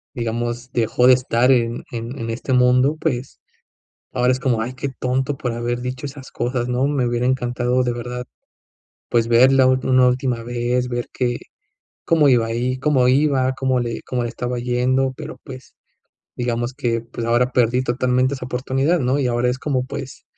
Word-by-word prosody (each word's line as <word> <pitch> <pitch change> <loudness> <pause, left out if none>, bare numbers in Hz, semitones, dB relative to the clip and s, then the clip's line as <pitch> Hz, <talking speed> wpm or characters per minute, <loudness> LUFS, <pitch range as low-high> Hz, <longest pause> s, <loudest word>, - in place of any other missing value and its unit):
digamos, 120 +1 -3
dejó 120 +1 +2
de 130 - +9
estar 125 0 +2
en 120 -2 +1
en 120 +2 -5
en 115 0 -4
este 120 +3 -3
mundo. 125 +3 +4
Pues, 125 +1 -3 0.7
ahora 125 0 +2
es 130 - -1
como: 125 -5 +1
"Ay, 125 +3 -5
qué 140 +2 -4
tonto 130 +2 -2
por 125 - -3
haber 120 +1 -2
dicho 125 +2 -5
esas 140 -1 -10
cosas", 120 0 -2
¿no? 125 +2 +1
Me 140 -3 0
hubiera 120 +1 0
encantado 125 0 0
de 125 -1 0
verdad, 125 +1 -5 0.8
pues, 115 -1 +1
verla 130 +3 +5
últ 130 0 +1
una 130 -1 +5
última 125 -1 0
vez, 120 +1 -1
ver 120 -1 -3
que 120 -1 -1 0.7
cómo 155 -4 +4
iba 120 -3 +4
ahí, 120 +3 -1
cómo 130 -3 +2
iba, 130 -1 +2
cómo 130 -1 0
le 120 -1 -3
cómo 125 -1 -2
le 120 - -2
estaba 120 +1 -4
yendo, 125 +2 +1
pero 155 -1 -8
pues 130 -2 -11 0.6
digamos 120 0 -2
que 120 -4 -1
pues 115 0 -6
ahora 120 +2 +2
perdí 125 +1 +2
totalmente 125 +1 +1
esa 130 -2 -6
oportunidad, 135 +6 0
¿no?, 130 +2 +1
y 135 - +1
ahora 120 0 +1
es 125 - -3
como, 130 -2 -1
pues, 135 0 -8
125 Hz, 185 wpm, -21 LUFS, 120-130 Hz, 0.8 s, de